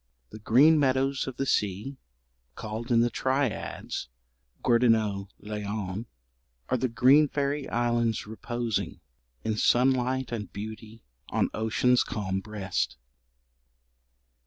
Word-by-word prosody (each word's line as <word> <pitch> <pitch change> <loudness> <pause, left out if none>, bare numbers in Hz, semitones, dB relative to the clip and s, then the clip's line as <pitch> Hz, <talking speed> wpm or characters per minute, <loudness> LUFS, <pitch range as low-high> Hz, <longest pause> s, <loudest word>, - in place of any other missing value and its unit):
The 110 - -9
green 140 +9 +5
meadows 135 0 +1
of 130 -1 -6
the 135 - -1
sea, 105 +4 -1 0.6
called 110 +3 -5
in 115 -1 +5
the 120 0 +2
triads 130 - -2 0.6
Gwerddonau 110 -5 +3 0.2
Llion, 105 0 -4 0.6
are - - +2
the 130 - 0
Green 135 +6 +5
fairy 140 0 -2
islands, 120 -2 0
reposing, 115 +1 -3 0.4
In 110 -1 -1
sunlight 130 +1 +2
and 110 -4 -4
beauty 110 +2 -8 0.3
on - - 0
ocean's 115 +3 +2
calm 95 -3 -3
breast. 100 - -3
115 Hz, 110 wpm, -27 LUFS, 105-130 Hz, 0.6 s, green